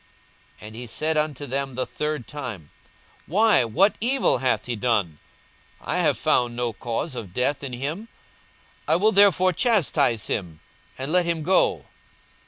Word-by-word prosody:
42:023:022 105 - -10
And 110 - -11
he 120 +1 -7
said 155 +7 -1
unto 150 -2 -1
them 135 0 -3
the 130 - -1
third 150 -4 -4
time, 120 - -7 0.6
Why, 210 - +4
what 185 - +2
evil 255 - +2
hath 130 0 0
he 120 - -3
done? 105 -9 -1 0.6
I - - -3
have - - +2
found 120 -1 +1
no 120 -1 -2
cause 120 +7 -4
of 105 -8 -8
death 140 +3 0
in 130 -3 -5
him: 150 - -4 0.8
I - - +3
will 210 +5 +3
therefore 185 -2 +5
chastise 155 - +2
him, 85 -6 -4 0.4
and 135 +3 -4
let 180 0 +2
him 165 -2 -1
go. 185 +4 +2
140 Hz, 160 wpm, -24 LUFS, 120-170 Hz, 0.8 s, therefore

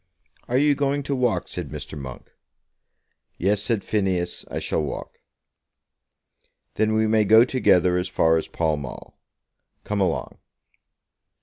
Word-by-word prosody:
"Are 125 - +1
you 145 +1 +4
going 140 0 0
to 140 0 -2
walk?" 125 -3 0
said 85 -5 -6
Mr. 75 0 -7
Monk. 65 -4 -9 1.1
"Yes", 100 +3 +1
said 110 -2 -1
Phineas; 95 -4 -1
"I - - -5
shall - - -1
walk." 75 - -6 1.5
"Then 110 0 +1
we 110 0 +3
may 110 0 +3
go 110 +3 +6
together 90 -9 +3
as 90 +1 -1
far 80 -3 +3
as 80 - -3
Pall 80 -2 0
Mall. 70 -3 -9 0.7
Come 105 -1 -2
along." 90 -4 -2
100 Hz, 135 wpm, -24 LUFS, 80-115 Hz, 1.5 s, go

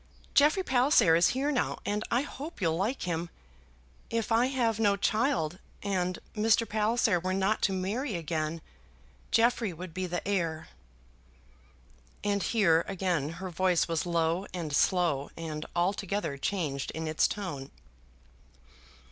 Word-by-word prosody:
Jeffrey 305 +7 +4
Palliser 250 - +4
is 170 - +5
here 285 +3 +1
now, 260 - 0
and 210 +1 -1
I 240 - +2
hope 290 +3 -8
you'll 165 -5 +1
like 210 +10 -1
him. 170 -1 -2 0.8
If 230 -1 -2
I 235 +3 +4
have 235 -5 0
no 205 -3 +3
child, 200 - 0 0.2
and 185 -3 -1 0.2
Mr. 225 +1 +3
Palliser 215 -2 +2
were 185 +2 -1
not 195 +3 +1
to - - +2
marry 205 +6 -2
again, 160 -1 -3 0.7
Jeffrey 230 -2 +2
would 170 0 -8
be 185 +1 -2
the 175 +1 -4
heir." 165 -6 -1 1.5
And 200 -1 +1
here 170 -9 +3
again 175 -6 -1
her 185 +2 -6
voice 180 0 +2
was 165 +1 -1
low 170 +2 0
and 160 -5 -2
slow, 165 -6 +2
and 155 -2 -5
altogether 195 -2 -1
changed 140 -3 -2
in 160 0 -3
its 155 0 +3
tone. 150 -10 -5
185 Hz, 140 wpm, -29 LUFS, 165-220 Hz, 1.5 s, is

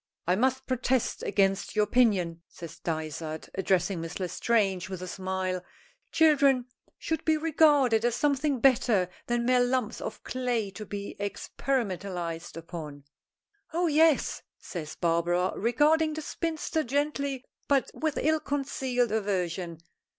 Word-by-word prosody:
"I 180 - +3
must 260 +5 +1
protest 255 -1 0
against 195 0 +1
your 210 - +4
opinion," 200 -7 +2
says 170 0 -10
Dysart, 160 -1 -4
addressing 190 -1 +1
Miss 165 +3 -6
L'Estrange 190 0 0
with 185 -1 -5
a - - -5
smile. 185 -1 -3 0.5
"Children 285 -6 +4 0.3
should 320 -2 -2
be 315 -1 +3
regarded 290 -7 +4
as 240 -1 +2
something 280 0 +1
better 230 -8 +3 0.2
than 240 0 0
mere 250 0 +4
lumps 245 -3 -1
of 220 - -6
clay 245 -5 -1
to 215 +1 -8
be 200 0 -5
experimentalized 190 -7 -3
upon!" 155 -4 -8 0.7
"Oh, 350 +2 +1
yes," 315 -1 +3 0.2
says 155 -4 -7
Barbara, 175 +2 +1
regarding 300 +7 +2
the 315 - -5
spinster 320 0 -2
gently 280 0 -1 0.2
but 275 -2 +2
with 310 -2 -2
ill 315 +2 +2
concealed 265 -5 -1
aversion. 180 -5 -1
225 Hz, 130 wpm, -28 LUFS, 180-275 Hz, 0.7 s, your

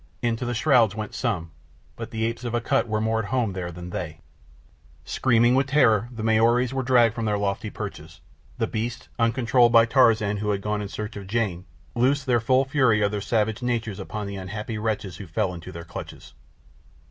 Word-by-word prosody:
Into 120 +1 0
the 120 0 -2
shrouds 120 -6 +3
went 110 -1 -5
some; 90 -10 -2 0.4
but 115 0 -7
the 110 -1 -2
apes 115 +1 -3
of 120 -1 -3
Akut 120 +2 +1
were 110 -1 -1
more 110 +1 0
at 105 -3 -4
home 115 -4 0
there 90 -2 -4
than 90 +1 -8
they. 80 -3 -5 0.9
Screaming 120 -1 +3
with 135 +1 +2
terror 120 -6 +3
the 115 -3 -6
Maoris 115 +3 +3
were 135 - 0
dragged 120 -3 +4
from 115 -1 -3
their 105 -1 +1
lofty 100 -1 -2
perches. - - -8 0.4
The - - +1
beasts, 115 +2 -4
uncontrolled 120 +1 +3
by 115 -1 +7
Tarzan 115 -4 +3
who 105 +1 -2
had 100 -1 0
gone 105 0 -1
in 100 - -4
search 105 +1 -6
of 100 -2 -8
Jane, 100 -5 -1 0.3
loosed 130 +4 +1
the 125 -3 +3
full 130 +3 +2
fury 130 -6 +2
of 100 - +1
their 105 -1 -3
savage 110 +1 0
natures 115 -5 -2
upon 105 -1 -5
the 100 0 -5
unhappy 105 +4 -5
wretches 105 -4 -3
who 100 - -9
fell 95 +2 -1
into 85 -2 -9
their 85 0 -8
clutches. 70 -5 -9
110 Hz, 200 wpm, -25 LUFS, 105-120 Hz, 0.9 s, by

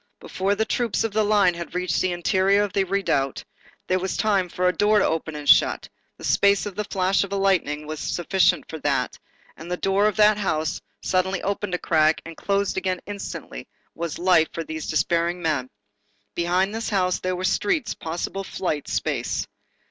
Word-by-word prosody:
Before 195 +2 -1
the 220 - 0
troops 235 -2 0
of 225 - -1
the 215 0 +2
line 205 -4 +4
had 170 0 -7
reached 180 -1 0
the 185 - +1
interior 190 +3 +2
of 205 - -4
the 195 -1 +2
redoubt, 175 -8 0 0.4
there 185 0 +1
was 190 +1 -3
time 200 -4 +1
for 180 +1 0
a 180 - +3
door 210 +4 +3
to - - +4
open 160 -1 -2
and 150 -1 -7
shut, - - +4 0.3
the - - -13
space 200 0 +3
of 205 -1 -6
a - - +1
flash 190 0 +1
of 200 - -7
lightning 190 -7 +1
was 155 0 -5
sufficient 180 -1 +1
for 160 - -7
that, - - -1 0.4
and 165 +2 -10
the 180 - -1
door 195 +3 +2
of 215 - 0
that 210 0 +5
house, 155 -5 -1 0.2
suddenly 185 +1 0
opened 200 -1 -2
a - - -1
crack 155 -2 +2
and 165 0 -8
closed 200 +1 -1
again 185 -1 -1
instantly, 200 - -7 0.3
was 170 -2 -4
life 175 -3 +4
for 165 - -3
these 160 -1 -6
despairing 170 +2 +1
men. 150 -7 -1 0.6
Behind 180 +4 +1
this 225 +1 -3
house, 185 -3 +1
there 185 0 -2
were 180 - -5
streets, 300 - 0
possible 175 +4 -4
flight, 165 -6 -3
space. - - -1
185 Hz, 190 wpm, -24 LUFS, 170-200 Hz, 0.6 s, that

